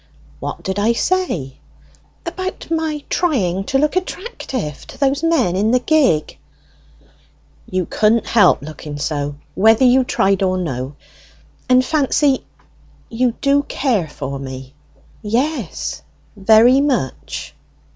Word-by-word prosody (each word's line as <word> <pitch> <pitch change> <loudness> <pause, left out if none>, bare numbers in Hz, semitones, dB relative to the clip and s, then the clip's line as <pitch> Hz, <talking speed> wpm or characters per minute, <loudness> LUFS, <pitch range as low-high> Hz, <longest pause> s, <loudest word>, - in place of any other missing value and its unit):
"What - - -6
did 190 +1 -2
I 220 +3 +3
say?" 235 - -1 0.7
"About 370 0 -5
my 315 -2 -1
trying 195 - 0
to 270 - +1
look 300 +4 +1
attractive 360 - -4
to - - -12
those 280 +1 +1
men 310 - +2
in 205 +3 +1
the 250 +2 +3
gig." 255 - +1 1.3
"You 185 -1 -1
couldn't 220 +5 +2
help 210 -10 +4
looking 150 -1 -8
so, 145 -1 -2 0.2
whether 225 +5 +4
you 255 +1 +5
tried 195 -5 +1
or 185 -1 +1
no. 135 -5 -4 0.7
And, 255 0 +5
Fancy, 285 -1 +2 0.7
you 240 +1 0
do 280 0 +3
care 245 - -1
for 140 -2 -6
me?" 130 0 -8 0.5
"Yes." 250 +9 -2 0.3
"Very 225 +6 +5
much?" 250 - -2
230 Hz, 120 wpm, -19 LUFS, 175-285 Hz, 1.3 s, you